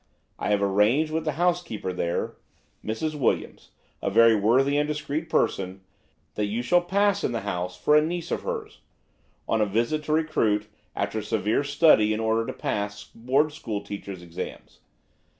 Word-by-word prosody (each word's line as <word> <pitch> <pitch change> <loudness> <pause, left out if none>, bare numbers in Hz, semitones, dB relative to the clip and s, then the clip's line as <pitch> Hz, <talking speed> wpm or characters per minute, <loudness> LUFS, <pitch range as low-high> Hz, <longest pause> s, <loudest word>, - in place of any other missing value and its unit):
I - - -2
have 100 -1 +2
arranged 105 +11 +3
with 160 0 -2
the 155 - 0
housekeeper 170 - -1
there–Mrs. 110 - -4
Williams, 140 -5 -1 0.3
a - - 0
very 115 +2 +6
worthy 125 +7 +3
and 150 0 +1
discreet 150 +1 -3
person–that 95 +2 -3
you 110 +4 -2
shall 175 +8 +4
pass 200 +3 +1
in - - 0
the 115 - -2
house 90 -2 -3
for 150 +11 +3
a 150 - +7
niece 170 +2 -3
of - - -1
hers, 450 -3 -5 0.7
on 110 - +1
a - - +4
visit 115 +9 0
to - - -3
recruit, 115 -10 +1 0.3
after 110 - -2
severe 105 +4 0
study 140 -7 +4
in 110 - -2
order 115 0 +1
to - - -2
pass 105 0 -3
board 135 +6 +1
school 110 -8 -4
teachers' 100 -3 -7
exams. 85 -1 -8
115 Hz, 160 wpm, -26 LUFS, 105-155 Hz, 0.7 s, a